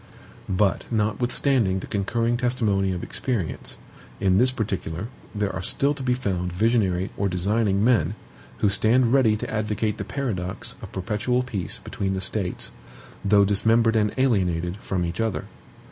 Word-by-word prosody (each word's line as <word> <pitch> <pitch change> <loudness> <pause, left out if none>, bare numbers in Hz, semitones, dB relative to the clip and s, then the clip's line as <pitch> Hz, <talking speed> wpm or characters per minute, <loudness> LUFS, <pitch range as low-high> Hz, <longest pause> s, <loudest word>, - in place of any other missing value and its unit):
But 95 +1 +1
notwithstanding 115 0 +2
the 95 - -5
concurring 115 +4 0
testimony 115 -6 +1
of 90 -1 -3
experience, 115 -11 -3 0.4
in 95 0 +3
this 125 +2 +5
particular, 100 -5 -3 0.3
there 100 -2 -1
are 95 - -3
still 140 +9 +2
to 140 - -8
be 125 -1 +1
found 90 -7 -2
visionary 95 -2 +1
or 100 0 +1
designing 100 +2 +1
men, 115 -3 +3 0.5
who - - +5
stand 115 +4 +3
ready 115 -6 +4
to - - -5
advocate 110 0 -1
the - - -2
paradox 95 -7 -3
of - - -9
perpetual 105 +6 0
peace 105 -8 -3
between 95 -1 -3
the - - -2
States, 95 -2 -3 0.5
though 100 0 +5
dismembered 115 +3 +3
and 105 -1 +2
alienated 90 -8 +1
from 95 -4 -2
each 85 +6 -3
other. 110 -3 -1
105 Hz, 150 wpm, -24 LUFS, 95-115 Hz, 0.5 s, this